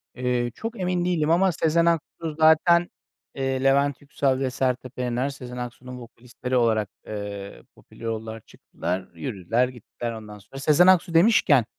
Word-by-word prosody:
Eee, 125 -1 -1
çok 225 -1 -6
emin 180 -1 0
değilim 165 -3 +1
ama 185 +2 +4
Sezen 165 +1 +2
Aksu 165 -1 -1
zaten, 170 +2 +5 0.5
eee, 135 -1 -1
Levent 140 0 +2
Yüksel 140 -2 0
ve 135 -1 0
Sertab 125 0 -2
Erener, 125 +2 -1
Sezen 125 -2 -9
Aksu'nun 125 +1 -7
vokalistleri 125 +2 -6
olarak, 110 -4 +2 0.2
eee, 100 -1 -7
popüler 115 - -14
oldular. 110 0 -4
Çıktılar, 90 +3 -5
yürüdüler, 115 0 -1
gittiler. 120 -1 -7
Ondan 105 -2 -9
sonra 135 +7 -11
Sezen 155 +6 +4
Aksu 180 -2 +4
demişken 165 - +5
130 Hz, 150 wpm, -24 LUFS, 120-160 Hz, 0.5 s, zaten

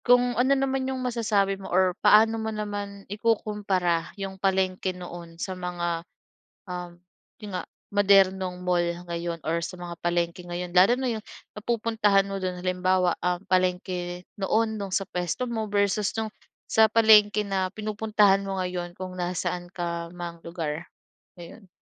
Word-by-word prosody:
Kung 245 0 +5
ano 255 +3 +2
naman 265 -1 0
'yong 265 - -2
masasabi 215 -6 0
mo 190 - -8
or 185 0 +3
paano 220 +1 +5
mo 220 - -2
naman 205 -2 -5
ikukumpara 205 -5 0
'yong 195 -1 -6
palengke 185 -1 0
noon 175 -2 -9
sa 185 +2 -3
mga, 175 -2 -3 0.6
um, 180 -2 -6 0.5
'yon 205 - -6
nga - - -5 0.3
modernong 190 -2 +3
mall 175 -1 +2 0.2
ngayon 170 0 -3
or 165 +2 0
sa 170 +2 -5
mga 175 -1 -8
palengke 175 0 -1
ngayon? 175 0 -4
Lalo 185 +6 +6
na 255 -1 -1
'yong 220 -2 -5 0.3
napupuntahan 220 -3 +2
mo 195 0 -4
do'n 185 -1 -2
halimbawa 185 -1 +1
um, 180 +1 -1
palengke 180 -1 0 0.2
noon 220 +2 +1
no'ng 195 -2 -3
sa 195 - +1
puwesto 180 +4 -3
mo 225 -3 -2
versus 200 0 +1
no'ng 220 -1 -2 0.4
sa 220 0 +6
palengke 215 -1 +6
na 195 -2 0
pinupuntahan 210 -2 +2
mo 195 - -2
ngayon, 175 -1 -4
kung 185 0 -6
nasaan 175 0 -2
ka 170 -1 -4
mang 170 -1 -7
lugar, 165 -1 -4 0.5
ngayon? 175 +4 -12
190 Hz, 150 wpm, -26 LUFS, 175-210 Hz, 0.6 s, Lalo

